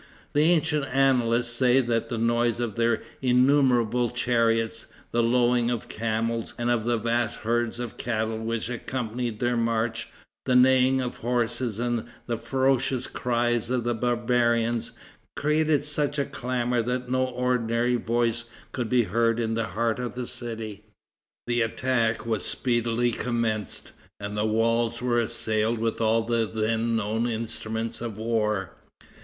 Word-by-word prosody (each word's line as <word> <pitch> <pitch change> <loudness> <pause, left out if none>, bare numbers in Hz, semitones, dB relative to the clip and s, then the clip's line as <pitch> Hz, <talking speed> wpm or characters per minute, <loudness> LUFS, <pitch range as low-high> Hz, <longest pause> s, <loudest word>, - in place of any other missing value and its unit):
The 145 - +3
ancient 160 -3 +2
annalists 125 -3 +2
say 125 +1 +4
that 115 -2 0
the 120 - -2
noise 120 +1 +1
of 120 -3 -2
their 115 -1 +1 0.2
innumerable 125 -2 +3
chariots, 115 -2 0 0.2
the 120 - +2
lowing 120 0 +3
of 120 -2 -3
camels 115 +1 -2
and 120 0 0
of 115 -2 0
the 120 0 +2
vast 115 +1 -1
herds 120 +1 0
of 120 -2 -5
cattle 110 -1 -2
which 115 0 -2
accompanied 120 -2 -3
their 120 0 +1
march, 115 -1 0 0.4
the 130 - +3
neighing 130 +1 +5
of 125 -1 -4
horses 120 -1 -1
and 120 -1 -1 0.2
the 115 -2 -2
ferocious 130 +1 +1
cries 120 -1 0
of 125 -2 0
the 120 +1 0
barbarians, 120 0 +1 0.4
created 150 0 +2
such 145 0 0
a 140 - +1
clamor 125 -1 -1
that 125 +2 -2
no 130 0 +2
ordinary 125 -1 0
voice 120 0 0 0.3
could 120 -3 -3
be 125 0 +4
heard 115 +1 +1
in 115 -1 0
the 115 -1 -1
heart 115 +4 -1
of 125 -1 -4
the 125 0 -3
city. 110 -4 -5 0.6
The 120 0 +1
attack 115 -1 0
was 110 -4 -1
speedily 120 -1 0
commenced, 115 -3 -2 0.3
and 100 +1 -5
the 105 +1 0
walls 115 +1 +1
were 120 -1 +1
assailed 110 -1 0
with 115 0 -2
all 115 0 +3
the 115 -1 0
then 115 +2 0
known 110 +2 0
instruments 115 0 -4
of 115 -3 -5
war. 105 -4 -1
120 Hz, 150 wpm, -26 LUFS, 115-125 Hz, 0.6 s, neighing